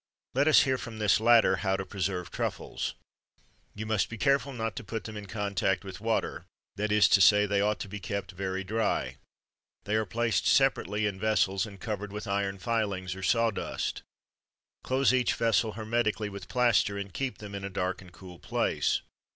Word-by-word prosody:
Let 140 +3 +2
us 155 - +7
hear 130 -1 0
from 115 -2 -7
this 105 -3 +3
latter 115 +1 +5
how 95 -2 0
to 95 - -4
preserve 95 -1 -3
truffles. - - -3 0.8
You 110 +1 -5
must 110 -2 0
be 115 - -7
careful 140 +1 +2
not 115 -5 -3
to - - -5
put 110 +3 -5
them 110 - -8
in 105 -1 -7
contact 100 -2 -1
with 95 0 -9
water; 115 0 -1 0.3
that 105 +1 -1
is 105 0 +6
to 100 - +5
say, 105 +4 +7
that 105 - -2
they 100 -1 +2
ought 105 +1 +1
to - - -4
be 105 +2 -7
kept 100 +1 -4
very 95 +1 -3
dry. 110 +2 -1 0.7
They 105 - -3
are 110 -1 +1
placed 115 -1 0
separately 105 +3 +2
in 100 -2 -2
vessels, 100 -2 +1
and 100 -2 -12
covered 105 -1 -4
with 105 +1 -6
iron 100 -1 -1
filings, 100 -5 -1
or 95 - -8
saw 115 +4 +2
dust. - - -3 0.8
Close 130 0 +2
each 125 -2 +2
vessel 115 -1 +1
hermetically 110 -1 -1
with 100 -2 -9
plaster, 120 -5 +2
and 100 -2 -6
keep 135 -2 -3
them 105 -1 -9
in 100 0 -5
a 100 - -3
dark 95 -1 -2
and 90 -1 -14
cool 90 -1 -12
place. - - 0
105 Hz, 195 wpm, -29 LUFS, 95-115 Hz, 0.8 s, us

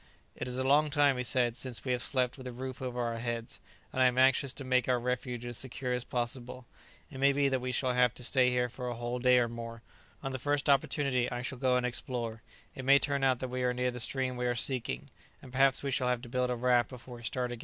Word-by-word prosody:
"It - - -5
is 125 0 -3
a 130 - 0
long 145 +3 +4
time," 145 -2 +3
he 125 - -1
said, 120 -2 +2
"since 125 0 -4
we 130 - 0
have 125 -1 0
slept 125 -2 0
with 130 -2 -9
a - - -5
roof 130 +1 -6
over 125 -1 -3
our 115 -1 -2
heads; 115 -1 -4 0.3
and 130 - 0
I - - +6
am 125 0 0
anxious 135 +1 +4
to 140 - -7
make 130 -1 +1
our 125 -1 +3
refuge 125 0 -3
as 120 -1 -1
secure 130 -1 -2
as 125 -1 -2
possible. 125 +1 -4 0.5
It 135 - -8
may 140 +1 +5
be 140 0 +2
that 130 -1 0
we 125 0 -2
shall 125 +1 0
have 125 -1 +3
to 125 - -6
stay 125 0 +4
here 125 0 +1
for 125 +1 -7
a 120 - -4
whole 120 +1 -3
day 125 0 +5
or 120 -1 +3
more; 115 0 -8 0.4
on 135 - -3
the 130 - -4
first 145 +2 +1
opportunity 135 -2 +1
I 120 0 -4
shall 130 0 -5
go 130 -1 +2
and 125 0 +1
explore; 120 -2 -3 0.3
it 135 - -7
may 140 +2 +7
turn 140 -1 0
out 130 -1 +3
that 130 - -3
we 125 +1 -3
are 125 0 +1
near 125 0 0
the 125 - -6
stream 130 +1 0
we 125 0 -1
are 120 - 0
seeking; 120 - -1 0.3
and 130 - -13
perhaps 135 +2 +4
we 140 - -1
shall 130 -1 0
have 125 -1 0
to 120 - -9
build 125 0 0
a 125 - 0
raft 120 0 +2
before 125 -1 -10
we 120 - -13
start 125 +2 -2
again." 120 - -6
125 Hz, 270 wpm, -31 LUFS, 120-130 Hz, 0.5 s, may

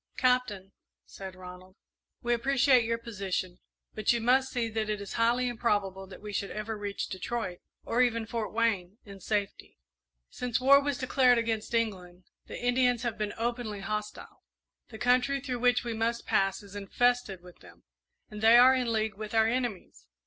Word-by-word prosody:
"Captain," 250 -7 +1 0.3
said 190 -1 -9
Ronald, 185 0 -12 0.5
"we 240 0 +1
appreciate 255 0 +3
your 230 0 0
position, 195 -5 -4 0.3
but 215 -1 +1
you 240 - +1
must 255 +3 +3
see 240 -2 -1
that 220 -1 -3
it 210 -1 -1
is 200 -1 -7
highly 240 +2 +2
improbable 205 -5 -1
that 190 - -13
we 210 -1 -7
should 200 - -2
ever 215 +1 -4
reach 205 -1 -4
Detroit, 185 -1 -4 0.2
or 240 - +1
even 230 -2 +1
Fort 225 -1 -4
Wayne, 210 -4 0
in 200 -1 -11
safety. 205 +1 -3 0.5
Since 250 -1 -2
war 275 +2 +6
was 285 -2 -2
declared 255 -2 +3
against 225 0 -2
England, 185 -6 -2 0.2
the - - -7
Indians 245 0 +2
have 235 -3 -3
been 210 -1 -2
openly 235 -3 -3
hostile. 210 +1 -5 0.5
The 220 - -9
country 250 +4 +2
through 255 -3 -4
which 245 +1 +3
we 235 -1 -3
must 230 +1 -2
pass 195 +1 +1
is 200 0 -13
infested 205 -1 0
with 180 -1 -15
them, 85 -2 -17 0.4
and 210 0 -9
they 225 +2 +7
are 255 +2 +8
in 250 -3 0
league 220 -2 -1
with 215 +1 -6
our 220 0 +5
enemies. 235 - -3
225 Hz, 175 wpm, -29 LUFS, 200-245 Hz, 0.5 s, are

